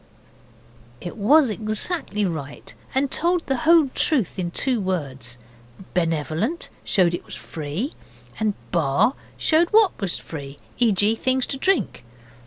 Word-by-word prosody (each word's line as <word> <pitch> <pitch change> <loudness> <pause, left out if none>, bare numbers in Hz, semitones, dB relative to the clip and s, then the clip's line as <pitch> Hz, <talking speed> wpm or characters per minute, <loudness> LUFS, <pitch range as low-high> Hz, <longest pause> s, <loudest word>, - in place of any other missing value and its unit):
It 175 - -7
was 255 +5 +4
exactly 215 - -2
right, 150 -6 -5 0.2
and 270 +1 +1
told 345 +1 +1
the 270 - 0
whole 330 -5 +6
truth 240 - 0
in 175 -2 -1
two 245 +5 0
words. 135 -10 -4 0.6
'Benevolent' 165 - -1
showed 180 -3 +2
it 175 - -3
was - - -9
free 160 - -5 0.5
and 215 -2 +1 0.2
'Bar' 170 - +2 0.2
showed 330 +2 +3
what 430 -2 +5
was 195 -3 -1
free; 140 -3 -8 0.2
e.g. 215 -2 +4
things 260 +2 0
to 270 - -2
drink. 375 - +1
210 Hz, 130 wpm, -23 LUFS, 165-270 Hz, 0.6 s, whole